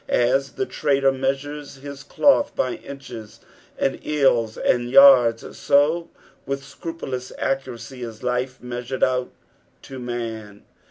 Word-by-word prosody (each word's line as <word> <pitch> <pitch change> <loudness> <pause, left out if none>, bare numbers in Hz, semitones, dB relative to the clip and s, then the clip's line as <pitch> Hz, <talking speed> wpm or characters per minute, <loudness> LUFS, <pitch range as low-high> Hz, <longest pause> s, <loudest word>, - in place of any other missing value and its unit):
As 135 +3 +2
the 395 - -2
trader 140 - +1
measures 135 +2 -3
his 140 0 -9
cloth 285 - +2
by 130 - 0
inches, 135 -6 -10 0.4
and 135 - -1
ells, 130 -7 +2
and 120 0 +1
yards, 125 -4 +6
so 155 +4 +2 0.3
with 140 +1 -4
scrupulous 135 -3 -6
accuracy 130 -2 -4
is 115 -2 -8
life 125 +1 -1
measured 125 +1 -4
out 125 -1 +1 0.5
to 135 -1 -9
man. 115 -4 -6
135 Hz, 120 wpm, -22 LUFS, 120-140 Hz, 0.5 s, yards